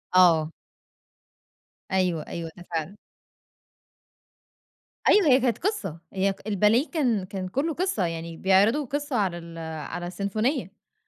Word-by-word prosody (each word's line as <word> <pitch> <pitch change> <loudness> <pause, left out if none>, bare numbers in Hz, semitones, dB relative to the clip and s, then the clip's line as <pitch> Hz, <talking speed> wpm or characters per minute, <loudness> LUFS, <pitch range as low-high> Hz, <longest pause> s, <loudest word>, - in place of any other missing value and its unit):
آه. 165 -3 +5 1.4
أيوه، 180 -4 0
أيوه، 165 -1 -5
ده 175 - -10
فعلًا. 165 +4 -3 2.1
أيوه 405 -5 +6
هي 265 -1 +6
كانت 245 -2 +1
قصة، 400 - -2
هي 195 0 +1
الباليه 215 - +3
كان 245 - +1
كان 190 -1 -5
كلّه 285 - -1
قصة 350 - 0
يعني 165 0 -5
بيعرضوا 205 +10 +3
قصة 285 +1 -3
على 190 -5 +1
ال 170 0 -10
على 165 +2 -5
السيمفونية، 200 - -1
أ - - -24
195 Hz, 125 wpm, -26 LUFS, 170-255 Hz, 2.1 s, أيوه